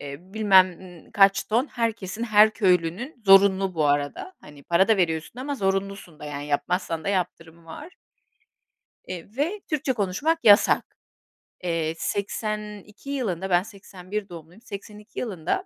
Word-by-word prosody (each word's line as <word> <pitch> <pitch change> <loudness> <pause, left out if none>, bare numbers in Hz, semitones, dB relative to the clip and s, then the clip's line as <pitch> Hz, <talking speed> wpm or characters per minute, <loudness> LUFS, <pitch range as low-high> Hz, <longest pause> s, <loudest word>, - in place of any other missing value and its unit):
eee, 140 -1 -7
bilmem 190 -2 +3 0.4
kaç 195 -1 +4
ton 235 +6 0
herkesin 225 -4 -3
her 215 -1 +6
köylünün 195 - 0
zorunlu 195 -1 +5
bu 155 -2 +1
arada, 145 - -1
hani, 145 -1 -15
para 175 +4 +2
da 220 - +4
veriyorsun 170 +6 -1
ama 285 +2 -3
zorunlusun 195 - -3
da, - - -8
yani, 145 0 -6
yapmazsan 165 +2 -2
da - - -2
yaptırımı 170 -3 -3
var. 295 - -11 1.1
Eee, 180 -3 -7
ve 350 +9 -1
Türkçe 285 -4 0
konuşmak 235 - 0
yasak. 205 -1 +4 0.7
Eee, 165 -2 -1
82 210 +4 -5
yılında 195 -9 -3
ben 175 0 +3
81 195 0 -8
doğumluyum, 170 +4 -12
82 210 -1 -9
yılında 205 - -3
195 Hz, 135 wpm, -24 LUFS, 170-215 Hz, 1.1 s, her